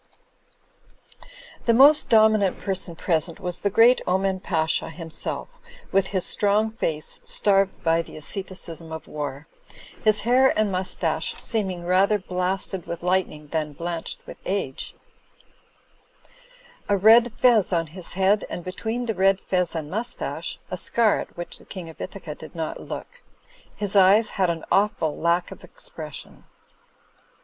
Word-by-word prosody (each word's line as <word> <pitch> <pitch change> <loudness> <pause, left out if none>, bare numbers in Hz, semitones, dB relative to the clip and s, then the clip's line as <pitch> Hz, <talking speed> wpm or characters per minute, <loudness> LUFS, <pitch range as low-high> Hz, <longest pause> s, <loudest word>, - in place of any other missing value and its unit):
The 230 - +5
most 290 +4 +6
dominant 215 -3 +4
person 190 -3 -3
present 165 -1 -1
was 180 -1 -2
the 200 - +1
great 230 +5 +5
Oman 190 +1 +1
Pasha 160 -3 0
himself, 165 0 -5 0.4
with 195 0 +2
his 190 -2 -2
strong 210 +2 +2
face 160 -8 -3
starved 195 -1 +2
by 165 0 +3
the 165 - -11
asceticism 170 -1 -6
of 160 -1 -7
war, 145 -1 -5 0.6
his 215 -2 +4
hair 255 +3 +4
and 215 -2 +2
mustache 185 0 -1
seem 215 -4 +1
ing 175 -2 -6
rather 190 +4 +3
blasted 185 -1 -2
with 170 0 -6
lightning 180 -5 -1
than 155 -2 -2
blanched 170 +2 -4
with - - -10
age; 185 -9 -3 1.9
a 200 - +3
red 225 +4 +6
fez 235 -6 +4
on 165 -2 +1
his 170 +3 -5
head, 195 +2 +2
and 175 - -5
between 225 +7 -3
the 225 - -1
red 195 0 +3
fez 180 -3 0
and 155 -2 -4
mustache, 225 +5 -3
a - - -2
scar 230 -3 +2
at - - -8
which 175 - -5
the - - -17
King 180 -4 -8
of 160 - -12
Ithaca 185 -5 -6
did - - -12
not 160 -1 -4
look. 485 0 -8 0.5
His 205 -1 -3
eyes 200 +3 +6
had 185 -3 +1
an 165 -1 -3
awftd 195 -6 +2
lack 170 +1 +1
of - - -11
expression. - - -9
185 Hz, 145 wpm, -24 LUFS, 170-210 Hz, 1.9 s, most